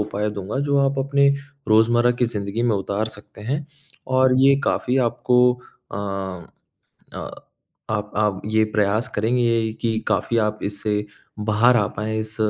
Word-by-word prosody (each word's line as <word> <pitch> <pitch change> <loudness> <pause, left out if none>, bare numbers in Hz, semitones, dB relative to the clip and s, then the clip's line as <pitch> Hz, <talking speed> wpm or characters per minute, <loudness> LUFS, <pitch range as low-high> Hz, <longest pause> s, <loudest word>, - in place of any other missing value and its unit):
उपाय 105 0 -2
दूँगा, 105 +4 -4
जो 140 0 +1
आप 140 0 +1
अपने 140 +1 +3 0.4
रोज़मर्रा 120 +2 +4
की - - +5
ज़िंदगी 105 -1 -3
में 120 -3 +2
उतार 100 +2 -2
सकते 105 0 -15
हैं। 140 +7 -3 0.4
और 130 0 +3
ये 135 +1 +6
काफ़ी 125 +1 0
आपको 125 +1 +1 0.5
अ, - - -4 1.2
अ, - - -6 0.7
आप 105 -1 -2
आप 105 -3 +1
ये 110 +1 +2
प्रयास 105 +3 +1
करेंगे 115 0 +1
कि 115 -1 0
काफ़ी 115 - +1
आप 105 -1 0
इससे 105 +1 -2 0.4
बाहर 120 +4 +5
आ 105 -4 +2
पाएँ, 110 +1 -2
इस 110 0 -4
110 Hz, 150 wpm, -22 LUFS, 105-125 Hz, 1.2 s, ये